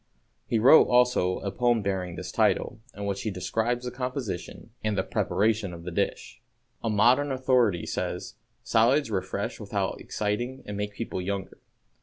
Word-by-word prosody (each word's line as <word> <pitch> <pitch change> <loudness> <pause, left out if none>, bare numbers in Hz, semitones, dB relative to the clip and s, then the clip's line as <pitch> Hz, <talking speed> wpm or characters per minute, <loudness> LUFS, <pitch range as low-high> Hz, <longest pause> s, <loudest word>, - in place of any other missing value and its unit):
He 115 - +1
wrote, 125 +8 +8
also, 125 -7 +3
a 100 - -3
poem 120 -2 +2
bearing 95 -3 -2
this - - -6
title, - - +1 0.2
in 100 - -5
which 100 -1 -2
he 110 - -2
describes 115 +6 -1
the 125 - -3
composition 125 -6 -5
and 105 -1 0
preparation 105 -2 +1
of 85 - -11
the 90 - -5
dish. - - -3 0.4
A 115 - 0
modern 120 +7 +4
authority 125 -8 +2
says, - - -3 0.3
"Salads 120 +3 +3
refresh 95 -3 -3
without - - -2
exciting 120 +6 -3
and 105 - -5
make 105 0 -4
people 115 -5 -4
younger." 95 +1 -4
110 Hz, 155 wpm, -27 LUFS, 100-125 Hz, 0.4 s, wrote